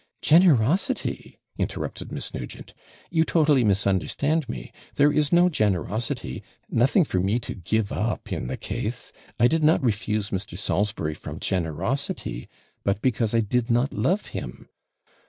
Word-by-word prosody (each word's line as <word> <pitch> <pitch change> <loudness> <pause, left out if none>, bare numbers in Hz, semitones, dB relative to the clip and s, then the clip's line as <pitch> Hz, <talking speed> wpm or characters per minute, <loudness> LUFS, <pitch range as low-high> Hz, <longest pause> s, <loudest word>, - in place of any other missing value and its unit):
'Generosity?' 170 - +3 0.2
interrupted - - -3
Miss - - -5
Nugent; - - -7 0.4
'you 160 -2 +3
totally 150 -6 +3
misunderstand 105 - +1
me; - - -6 0.2
there 145 +1 +5
is 150 -1 +2
no 175 +1 +6
generosity, 110 - -1 0.3
nothing 135 - +4
for 95 - -1
me 100 +5 +1
to 120 - -5
give 100 +3 -1
up 110 +5 -2
in - - -3
the 65 - -4
case. - - -3 0.3
I 120 - +6
did 160 +3 +1
not 155 -2 +4
refuse 105 -2 0
Mr. 95 -2 -4
Salisbury 100 -5 -1
from - - -8
generosity, 90 - -2 0.3
but 100 0 +1
because 115 -3 +1
I 115 - +4
did 115 +3 0
not 120 +4 +2
love 195 +4 +1
him. - - -7
115 Hz, 140 wpm, -25 LUFS, 100-145 Hz, 0.4 s, no